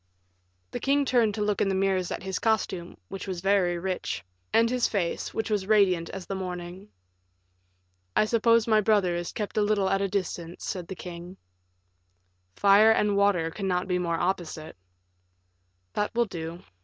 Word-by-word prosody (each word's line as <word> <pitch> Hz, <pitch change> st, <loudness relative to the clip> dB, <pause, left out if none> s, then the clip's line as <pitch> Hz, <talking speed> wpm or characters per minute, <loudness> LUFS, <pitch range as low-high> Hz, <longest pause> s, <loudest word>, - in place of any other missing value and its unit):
The -, -, -4 dB
king 280 Hz, +1 st, +2 dB
turned 235 Hz, -5 st, +2 dB
to 210 Hz, -, -1 dB
look 205 Hz, -1 st, 0 dB
in 195 Hz, -, +2 dB
the 190 Hz, -, 0 dB
mirrors 190 Hz, -2 st, +1 dB
at -, -, -5 dB
his 190 Hz, -1 st, -3 dB
costume, 190 Hz, -6 st, -1 dB
which 195 Hz, +1 st, -7 dB
was 185 Hz, -2 st, -3 dB
very 190 Hz, -2 st, +2 dB
rich, 170 Hz, -, -3 dB, 0.3 s
and 230 Hz, +1 st, +4 dB
his 245 Hz, 0 st, +1 dB
face, 180 Hz, -5 st, -2 dB
which 220 Hz, 0 st, -3 dB
was 200 Hz, -3 st, 0 dB
radiant 185 Hz, -6 st, +3 dB
as 185 Hz, -, -7 dB
the -, -, -5 dB
morning. 180 Hz, +1 st, -6 dB, 1.3 s
"I -, -, +4 dB
suppose 230 Hz, 0 st, +3 dB
my 215 Hz, -2 st, +4 dB
brother 200 Hz, -4 st, +2 dB
is 175 Hz, 0 st, -4 dB
kept 210 Hz, -1 st, -5 dB
a -, -, +4 dB
little 205 Hz, -2 st, +2 dB
at 195 Hz, 0 st, +1 dB
a 200 Hz, -, +1 dB
distance," 180 Hz, -3 st, -4 dB
said 180 Hz, -4 st, -4 dB
the 190 Hz, -, -6 dB
king. 175 Hz, +1 st, -9 dB, 1.2 s
"Fire 205 Hz, -, +6 dB
and 210 Hz, -2 st, +3 dB
water 195 Hz, -5 st, +2 dB
cannot 185 Hz, -1 st, -2 dB
be 180 Hz, -1 st, 0 dB
more 170 Hz, -2 st, -1 dB
opposite." 175 Hz, -4 st, -3 dB, 1.2 s
"That 210 Hz, +2 st, -2 dB
will 235 Hz, 0 st, +3 dB
do. 170 Hz, -2 st, -7 dB
195 Hz, 170 wpm, -27 LUFS, 180-210 Hz, 1.3 s, Fire